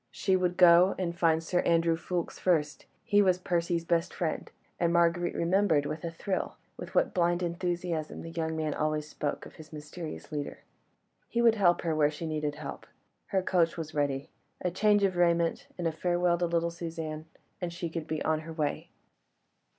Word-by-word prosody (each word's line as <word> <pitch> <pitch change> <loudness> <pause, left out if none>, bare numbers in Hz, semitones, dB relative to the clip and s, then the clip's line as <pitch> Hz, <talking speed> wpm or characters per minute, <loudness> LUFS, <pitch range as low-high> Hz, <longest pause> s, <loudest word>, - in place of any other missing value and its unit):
She 190 -1 +1
would 180 -1 0
go 180 +1 +7
and 175 -2 -2
find 165 -2 +2
Sir 175 +2 0
Andrew 165 -1 +3
Ffoulkes 175 +1 -4
first; 155 -5 0 0.2
he 205 -2 +4
was 185 -3 +4
Percy's 170 -2 -1
best 170 0 0
friend, 165 -3 -2 0.3
and 170 -1 +2
Marguerite 170 0 +2
remembered 170 -4 +2
with 155 +2 -4
a 170 - -2
thrill, 185 +3 -3 0.2
with - - -9
what - - +3
blind 175 -1 +2
enthusiasm 175 -2 -2
the 165 - -7
young 160 -1 -2
man 155 -1 -1
always 155 0 -1
spoke 150 -1 -4
of - - -13
his 155 -1 -12
mysterious 155 +2 -8
leader. 145 -1 -5 0.7
He 235 - -1
would 235 -1 +6
help 185 -5 +3
her 165 -2 -1
where 150 -1 +4
she 150 +2 -6
needed 150 -2 -2
help; 150 -2 -8 0.4
her 190 -1 0
coach 175 -3 +2
was 160 -1 -5
ready. 140 -2 -1 0.3
A 180 - 0
change 205 +2 +3
of 190 -2 +1
raiment, 170 -1 +2
and 175 - -3
a - - +1
farewell 175 +1 +1
to 175 - +1
little 170 0 0
Suzanne, 160 -2 -5 0.4
and 175 -1 -2
she 170 0 -4
could 165 -1 -5
be 155 -1 -2
on 155 -1 +1
her 160 +1 -8
way. 150 -3 -2
170 Hz, 190 wpm, -29 LUFS, 155-180 Hz, 0.7 s, go